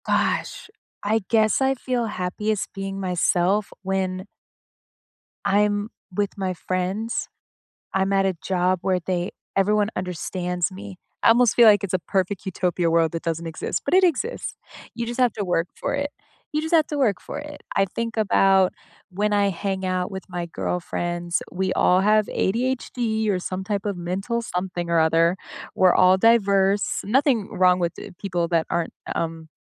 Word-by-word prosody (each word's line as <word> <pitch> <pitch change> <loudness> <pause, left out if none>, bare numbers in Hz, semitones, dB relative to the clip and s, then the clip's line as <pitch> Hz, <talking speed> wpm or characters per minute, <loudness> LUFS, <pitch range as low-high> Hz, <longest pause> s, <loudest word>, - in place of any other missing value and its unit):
Gosh, - - 0 0.4
I 220 +2 +1
guess 220 +1 +3
I 265 0 +3
feel 245 -1 -1
happiest 210 +2 -2
being 195 0 -5
myself 185 +2 +1
when 190 -1 -2 1.2
I'm 205 +1 +2 0.3
with 205 0 -1
my 190 -2 -1
friends. 185 +6 -2 0.7
I'm 195 0 +1
at 195 0 +3
a 190 -2 0
job 185 0 +1
where 185 -1 +1
they 180 -1 -1 0.3
everyone 205 +1 +3
understands 180 0 -2
me, 195 0 -9 0.2
I - - +5
almost 235 0 +5
feel 235 - +8
like 205 -2 +6
it's 195 -2 -3
a - - +3
perfect 190 +2 -2
utopia 180 -2 0
world 165 -1 +3
that 165 - -4
doesn't 165 0 -3
exist, 160 -1 -3
but 285 - +1
it 375 0 +6
exists. 365 - -1 0.4
You 235 -1 -3
just 240 +2 -5
have 250 -3 +4
to 205 -3 -4
work 175 -1 0
for - - -1
it, 285 +1 -1 0.4
you 305 - +1
just 320 +2 -1
have 315 -2 +5
to 295 - -3
work 225 -9 +2
for - - -6
it. 295 0 -9
I 195 - +3
think 230 +4 -4
about 195 -3 +4 0.4
when 205 +3 0
I 205 -1 +3
hang 190 0 -2
out 185 0 -1
with 190 -1 -6
my 175 -1 -4
girlfriends, 175 0 -2
we 190 +1 -1
all 180 +1 +4
have 215 +1 +4
ADHD 230 -1 -1
or 190 - +1
some 185 +1 -4
type 200 0 -2
of 200 -2 -1
mental 195 +7 -2
something 180 -4 -3
or 170 -1 +4
other. 165 +2 +3 0.4
We're 185 -1 +5
all 185 +1 +5
diverse. 200 -2 +3
Nothing 245 -1 +2
wrong 180 0 +4
with 170 -2 -1
t - - -9
people 175 -4 -1
that 165 -2 +1
aren't, 170 -1 -1 0.2
um, 165 -1 -3
195 Hz, 170 wpm, -23 LUFS, 180-215 Hz, 1.2 s, feel